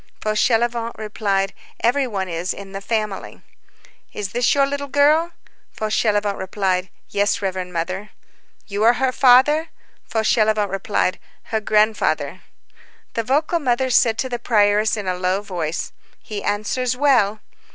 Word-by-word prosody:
Fauchelevent 230 +2 +1
replied:— 200 -2 -1 0.3
"Every 260 +3 +2
one 195 -5 -3
is 170 +1 -3
in 195 -1 -10
the 195 0 -6
family." 215 -2 -3 0.7
"Is 200 -2 -4
this 245 +4 +2
your 280 -1 +4
little 285 0 -4
girl?" 300 +5 +3 0.4
Fauchelevent 210 -2 0
replied:— 190 -1 -1 0.2
"Yes, 205 0 +1
reverend 185 -2 -3
Mother." 185 +4 -3 0.6
"You 205 0 -4
are 235 +2 +6
her 260 +1 0
father?" 270 +6 +5 0.4
Fauchelevent 215 -2 +2
replied:— 195 -1 -1 0.3
"Her 220 - +1
grandfather." 215 +1 +1 0.7
The 230 - 0
vocal 300 +7 +1
mother 260 -2 0
said 225 -2 +4
to 260 - -1
the 240 -1 -4
prioress 215 -1 +2
in 205 - -4
a 185 - 0
low 185 +2 -1
voice 170 -5 -3 0.3
"He 210 -2 -6
answers 245 +4 -1
well." 240 -7 +3
215 Hz, 135 wpm, -21 LUFS, 195-245 Hz, 0.7 s, are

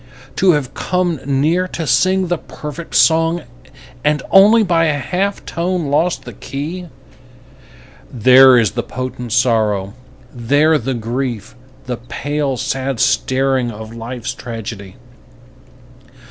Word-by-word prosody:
To 185 -2 +4
have 135 -3 -2
come 180 -4 -1
near 155 +7 +1
to 170 -2 -5
sing 185 +9 +2
the 175 -2 -1
perfect 150 +2 -8
song 165 +1 +3 0.6
And 150 0 +1
only 210 +4 +6
by 170 -4 +2
a 150 -2 +1
half 190 +9 -2
tone 170 -3 -2
lost 145 -2 0
the - - -8
key, 165 +6 -6 1.2
There 130 +2 +6
is 110 -5 +2
the 120 +3 -2
potent 125 -1 -6
sorrow, 110 -5 +1 0.4
there 145 +6 +2
the 130 +2 -3
grief, 120 -2 -4 0.3
The 125 -2 -4
pale, 140 +3 -3
sad 135 0 -3
staring 130 -1 +1
of 110 0 -9
life's 115 +1 -5
tragedy. 110 -5 -8
135 Hz, 120 wpm, -17 LUFS, 120-165 Hz, 1.2 s, only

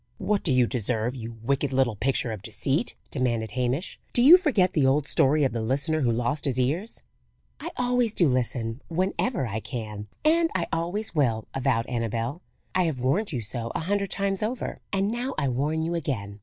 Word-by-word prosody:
"What 210 -1 0
do 160 - 0
you 125 -1 +4
deserve, 115 0 -1
you 115 -2 -6
wicked 140 +2 0
little 130 -4 +2
picture 125 +1 0
of 110 -3 -6
deceit?" 135 +7 -1 0.2
demanded 120 -5 -1
Hamish. 125 - -2
"Do 240 - +4
you 305 +7 +11
forget 255 - +2
the 150 - +2
old 140 +2 +2
story 145 +3 +3
of 135 - +2
the 115 - -2
listener 140 +7 0
who 120 -3 +2
lost 120 +6 0
his 130 -3 0
ears?" 160 - -1 0.6
"I 335 - -5
always 245 -3 +1
do 170 - +4
listen 125 -1 0
whenever 185 - 0
I 110 -1 -3
can, 110 -3 -6 0.2
and 330 +1 +4
I 170 -2 +1
always 175 +6 -2
will," 120 -8 +1
avowed 130 -3 +1
Annabel. 115 - -2 0.3
"I 185 - +2
have 160 -5 -1
warned 165 - +1
you 125 -5 -2
so 115 +2 -4
a - - -1
hundred 200 +3 -1
times 195 0 -1
over, 225 +3 -3
and 195 +1 +1
now 250 +3 -3
I 140 - +1
warn 150 +6 0
you 165 +1 -1
again. 110 -11 -3
135 Hz, 195 wpm, -26 LUFS, 120-185 Hz, 0.6 s, you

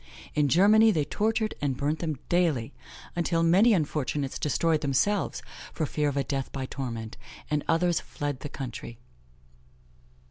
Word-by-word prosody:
In 150 -1 +2
Germany, 210 - +6
they 155 -9 +1
tortured 220 +6 0
and 135 -3 -1
burnt 150 +3 -1
them 155 -4 -2
daily, 160 -11 +1 0.4
until 170 -1 +1
many 190 +8 +5
unfortunates 150 - -1
destroyed 155 +1 +1
themselves 160 +8 0 0.3
for 160 - -1
fear 150 0 0
of 140 - -4
a 140 - +2
death 135 -1 -3
by 135 -1 -4
torment, 115 -5 -5 0.3
and 150 -1 +1
others 170 +1 +2
fled 145 -3 -5
the 145 - -6
country. 120 -4 -7
150 Hz, 145 wpm, -27 LUFS, 135-175 Hz, 0.4 s, Germany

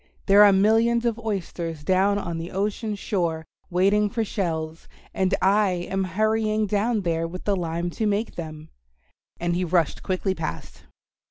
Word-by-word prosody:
There 200 +1 +7
are 205 - +8
millions 225 +4 +3
of 235 -1 0
oysters 175 -7 -4
down 190 +4 +2
on 170 -5 -4
the 165 +1 -5
ocean 210 +2 -2
shore 170 -6 -2 0.2
waiting 200 +4 +2
for 225 0 -1
shells, 165 -5 -3 0.3
and 190 0 +1
I 200 +1 +4 0.2
am 190 0 0
hurrying 215 +3 +1
down 210 +2 0
there 165 -2 -1
with 180 +2 -8
the 205 - +1
lime 170 -1 -2
to 215 +5 -1
make 210 +2 -1
them," 155 -2 -8 0.7
and 175 0 -1
he 180 - 0
rushed 170 -2 +1
quickly 190 0 -1
past. 155 - -6
190 Hz, 160 wpm, -24 LUFS, 170-210 Hz, 0.7 s, are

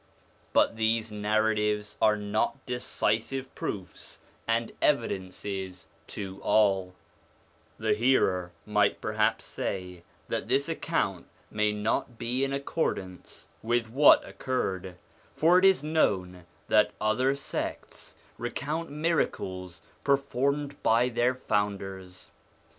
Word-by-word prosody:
But 115 - +3
these 110 0 +1
narratives 105 0 0
are 105 -1 +5
not 105 +6 -1
decisive 125 +1 -1
proofs 95 -4 -5 0.3
and 115 0 +1
evidences 95 -6 -1 0.2
to 95 -1 -6
all; 95 -4 +2 0.8
the - - +1
hearer 95 -7 +2
might 105 -1 +2
perhaps 110 +1 0
say 90 -2 -4 0.3
that - - -2
this 140 +1 +2
account 160 - -1 0.2
may 105 0 +2
not 110 +3 -1
be 125 +3 0
in 135 - 0
accord 140 +4 0
ance 90 -1 -9 0.2
with 115 0 0
what 140 +4 +6
occurred, 95 -8 -3 0.4
for 170 +3 +5
it 190 - +3
is 190 -7 +5
known 95 - 0 0.2
that 105 -1 +4
other 125 +6 +2
sects 140 - -5 0.2
recount 150 +7 -3
miracles 95 - -2 0.2
performed 140 +1 0
by 120 +3 +3
their 120 +1 +1
founders. 95 -5 -3
110 Hz, 110 wpm, -28 LUFS, 95-130 Hz, 0.8 s, what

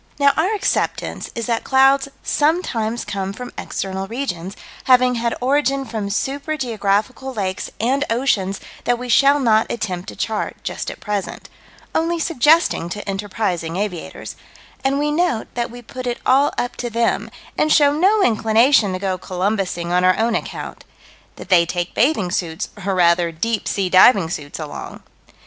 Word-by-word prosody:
Now 280 -1 +4
our 370 +7 +1
acceptance 400 - -1
is 230 -1 -3
that 230 -2 -1
clouds 270 +1 +4 0.2
sometimes 250 -8 0
come 195 0 -3
from 250 +3 -8
external 190 0 -4
regions, 195 -6 -4 0.3
having 255 -1 +5
had 235 -1 -1
origin 275 +1 +1
from 215 -5 -4
super 280 +8 -2
geographical 230 +1 -1
lakes 190 -3 -3
and 265 +5 +1
oceans 220 -5 0 0.3
that 245 0 +2
we 250 +1 -7
shall 280 +4 +5
not 220 -4 +2
attempt 185 -6 -4
to - - -9
chart, 220 -2 -3
just - - -4
at - - -9
present 205 -2 -4 0.4
only 335 +1 +1
suggesting 320 - +2
to 205 +4 -6
enterprising 195 -4 -2
aviators 190 -3 -5 0.5
and 270 +1 +1
we 295 +1 0
note 325 -7 0
that 240 0 -2
we 245 +1 -11
put 255 +2 -7
it 240 - -1
all 275 +3 +4
up 245 - -2
to 240 - -3
them, 230 -2 0 0.3
and 305 - +1
show 290 -2 +5
no 390 +7 +3
inclination 225 - +3
to - - -2
go 185 -1 -2
Columbusing 185 -2 -2
on 180 +1 +2
our 185 0 +4
own 230 +1 +1
account - - -5 0.5
that - - -11
they 175 -3 +6
take 175 +1 -3
bathing 225 - +1
suits, 165 -3 -2 0.2
or, 195 - +1
rather, 170 -1 +3
deep 220 +7 -2
sea 195 -2 0
diving 185 -1 +5
suits 145 -4 -5
along. 155 -2 -8
225 Hz, 165 wpm, -20 LUFS, 190-270 Hz, 0.5 s, they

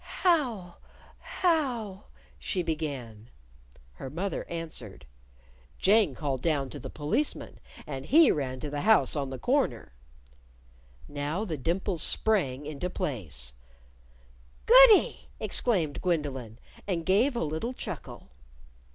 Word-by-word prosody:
"How 245 - +1 0.4
how 250 - -1 0.2
?" - - -27
she 185 -3 -1
began. 135 -9 -5 0.6
Her 130 - -8
mother 180 +7 -4
answered. 160 - -7 0.7
"Jane 200 - +3
called 135 -3 -2
down 140 -5 0
to - - -7
the - - -7
Policeman, 155 - -2 0.3
and 135 -2 -6
he 315 +3 +7
ran 130 -3 -2
to 150 - -5
the 145 0 -3
house 220 -3 +4
on 140 -2 -2
the 130 - -5
corner." 190 - 0 1.1
Now 145 +8 -3
the 165 -6 -3
dimples 170 +4 -1
sprang 150 -11 +1
into 150 +4 -4
place, 90 - -5 1.1
"Goody!" - - +7
exclaimed 175 - -1
Gwendolyn, 140 - -2 0.3
and 170 -4 -2
gave 225 - +3
a 235 - 0
little 160 +12 -3
chuckle. - - -8
160 Hz, 115 wpm, -28 LUFS, 135-215 Hz, 1.1 s, he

